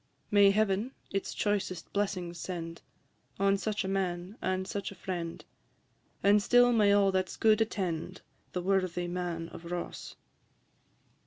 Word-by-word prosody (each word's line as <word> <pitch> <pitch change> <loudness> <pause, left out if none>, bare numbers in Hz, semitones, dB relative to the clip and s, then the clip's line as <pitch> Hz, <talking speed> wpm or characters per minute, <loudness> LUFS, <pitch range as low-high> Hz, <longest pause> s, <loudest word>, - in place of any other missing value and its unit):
May 200 -1 +7
Heaven 210 +4 +1 0.2
its 195 - -2
choicest 195 -4 -2
blessings 180 -4 -2
send 165 -1 -5 0.6
On 195 0 +4
such 210 +1 -2
a - - -2
man, 185 0 -2
and 185 0 -1
such 200 -1 -4
a - - -10
friend; 175 -3 -5 0.8
And 205 +1 +5
still 245 +3 +5
may 210 -3 +5
all 200 -1 +4
that 185 -1 0
's - - -8
good 220 0 +4
attend 185 -4 -2 0.3
The 180 - -2
worthy 185 -2 0
Man 175 -2 -3
of - - -10
Ross. 175 -1 -5
190 Hz, 145 wpm, -30 LUFS, 175-205 Hz, 0.8 s, May